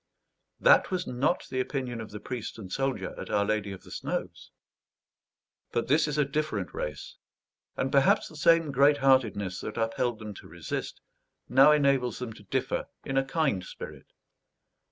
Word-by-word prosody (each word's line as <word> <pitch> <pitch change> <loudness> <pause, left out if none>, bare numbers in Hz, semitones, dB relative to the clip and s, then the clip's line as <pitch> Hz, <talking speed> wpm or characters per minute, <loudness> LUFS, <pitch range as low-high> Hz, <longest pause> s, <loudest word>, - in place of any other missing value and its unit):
That - - +5
was 185 -2 -1
not 130 +7 0
the 130 - -1
opinion 130 -3 -3
of 110 - -8
the 105 - -8
priest 120 -1 -6
and 95 -5 -9
soldier 135 -8 -1
at - - -7
Our 100 -1 +2
Lady 105 -1 -1
of 95 - -9
the - - -14
Snows. - - -4 1.2
But 120 - -1
this 150 +3 +4
is 150 0 -2
a 150 - +3
different 140 - -2
race; 75 -2 -5 0.6
and 135 - -1
perhaps 140 -1 +4
the 155 - -13
same 165 0 +4
great 140 +2 +5
heartedness 110 -9 +2
that 105 - -6
upheld 115 +1 0
them 105 -1 -7
to - - -14
resist, 85 0 -5 0.5
now 135 +4 +7
enables 140 -5 +2
them 125 -3 -5
to 105 - -14
differ 100 - -2 0.2
in 135 - -3
a 135 - +3
kind 135 - 0
spirit. - - -9
125 Hz, 170 wpm, -28 LUFS, 105-140 Hz, 1.2 s, now